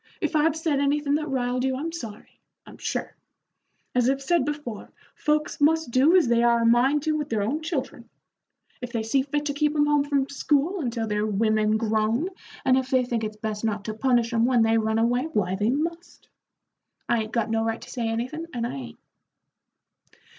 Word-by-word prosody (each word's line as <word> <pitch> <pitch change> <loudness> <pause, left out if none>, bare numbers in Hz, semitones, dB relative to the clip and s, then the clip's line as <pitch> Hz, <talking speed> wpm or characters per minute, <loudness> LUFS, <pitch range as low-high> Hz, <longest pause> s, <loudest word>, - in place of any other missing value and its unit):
"If - - -2
I've 305 +1 +3
said 320 -3 0
anythin' 285 0 +1
that 305 +1 0
riled 250 -1 -1
you, 265 0 0
I'm 315 +5 -3
sorry, 230 -11 -9 0.3
I'm - - -14
sure. - - -3 0.8
As 250 0 +3
I 270 - +2
said 275 +1 +1
before, 290 -7 -5 0.2
folks 300 -1 -1
must 320 -2 +3
do 275 +8 +5
as 355 -8 +5
they 235 0 +3
are 235 0 +3
a - - +2
mind 260 +5 +3
to 315 - +1
with 295 -1 -3
their 215 -3 0
own 280 +10 -1
children. 275 -7 -4 0.7
If 245 -1 -6
they 230 -2 -2
see 245 +5 +2
fit 290 +2 -2
to 285 - -1
keep 300 +1 0
'em 295 -1 +3
home 295 -1 +3
from 280 -2 0
school 295 +6 0
until 235 -4 -2
they're 210 0 -1
women 215 +1 +2
grown, 220 - 0 0.4
and 260 0 +4
if 260 -1 -5
they 260 -2 +2
think 235 -2 -2
it's 215 0 -4
best 215 -1 -4
not 210 -2 -2
to 215 - -3
punish 240 0 +1
'em 230 0 +3
when 245 -2 +3
they 225 0 +3
run 220 0 0
away, 245 +4 +1
why 190 -5 0
they 205 +3 0
must. 335 +6 -4 0.8
I 235 -1 +2
'ain't 215 0 -6
got 225 -2 -1
no 225 0 +1
right 225 0 -2
to - - -11
say 240 -3 -2
anythin', 255 +9 -3
and 235 -1 -1
I - - -4
'ain't." 130 -4 -8
250 Hz, 205 wpm, -25 LUFS, 225-295 Hz, 0.8 s, do